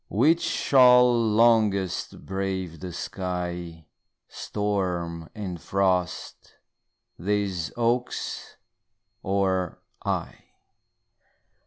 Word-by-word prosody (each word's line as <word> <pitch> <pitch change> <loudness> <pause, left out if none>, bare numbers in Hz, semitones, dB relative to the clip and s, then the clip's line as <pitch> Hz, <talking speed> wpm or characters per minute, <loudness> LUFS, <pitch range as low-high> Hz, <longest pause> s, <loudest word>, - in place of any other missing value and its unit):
Which 155 +11 +3
shall 125 -2 +5 0.2
longest 105 -4 +2
brave 95 -3 -3
the 90 +2 -6
sky, 90 -2 -5 0.4
Storm 90 -5 -3
and 95 -5 -5
frost 95 -2 -1 0.6
these 95 -3 -1
oaks 120 +1 -2 0.6
or 95 -2 0 0.3
I? - - -2
95 Hz, 65 wpm, -26 LUFS, 90-105 Hz, 0.6 s, shall